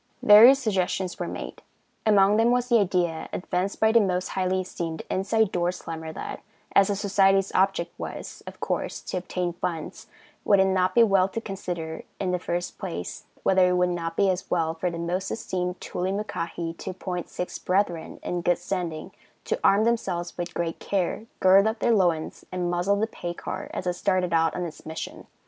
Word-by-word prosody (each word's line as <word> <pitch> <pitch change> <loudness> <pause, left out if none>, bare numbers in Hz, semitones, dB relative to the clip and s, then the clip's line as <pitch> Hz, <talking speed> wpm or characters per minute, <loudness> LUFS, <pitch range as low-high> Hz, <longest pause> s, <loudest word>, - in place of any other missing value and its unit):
Various 225 +6 +9
suggestions 190 -6 -1
were - - -2
made; - - -7 0.5
among 205 0 +5
them 225 +1 +4
was 245 0 +1
the 235 -2 +5
idea 175 -4 0
advanced 180 +2 -2
by 220 0 +4
the 230 - +6
Most 185 -3 0
Highly 185 0 0
Esteemed 165 -3 -5
Inside 205 +2 +1
Door 175 0 0
Slammer 160 -2 -6
that, - - -6 0.3
as 195 -1 +6
the 205 - 0
society's 195 -1 +3
object 190 -2 +1
was, - - -7
of - - -9
course, - - -2
to - - -4
obtain 180 -1 -2
funds, 165 -2 -5 0.4
would 200 -2 +4
it 190 - +5
not 185 -1 +1
be 235 - +7
well 195 -4 +4
to 225 - -3
consider, 175 -6 -5 0.2
in 185 -2 -1
the 180 - 0
first 175 +1 -3
place, 85 +1 -5 0.2
whether 185 -1 +4
it - - +2
would 180 0 +2
not 165 -1 -3
be 200 - +4
as 185 0 -4
well 165 -2 +1
for 165 +2 -2
the 170 - -6
Most 180 +3 -2
Esteemed 180 -4 -3
Toolymuckahi 180 -3 -3
to - - -5
appoint 180 -1 -5
six 180 - -5
brethren 185 -3 -1
in 175 0 -2
good 175 0 +2
standing 175 -3 -4 0.3
to - - -1
arm 200 +2 +5
themselves 190 -7 -1
with 175 0 -5
great 170 -1 -2
care, 200 +3 -2
gird 195 +2 +6
up 220 +2 -1
their 235 - +2
loins 175 -6 +1
and 180 -1 -1
muzzle 175 +3 +1
the 210 +2 +1
pay 175 -6 -6
car - - -6
as - - -5
it 180 - +1
started 185 -2 0
out 165 -1 +2
on 180 - -2
its 160 -2 -9
mission. 160 0 -7
185 Hz, 190 wpm, -26 LUFS, 175-195 Hz, 0.5 s, Various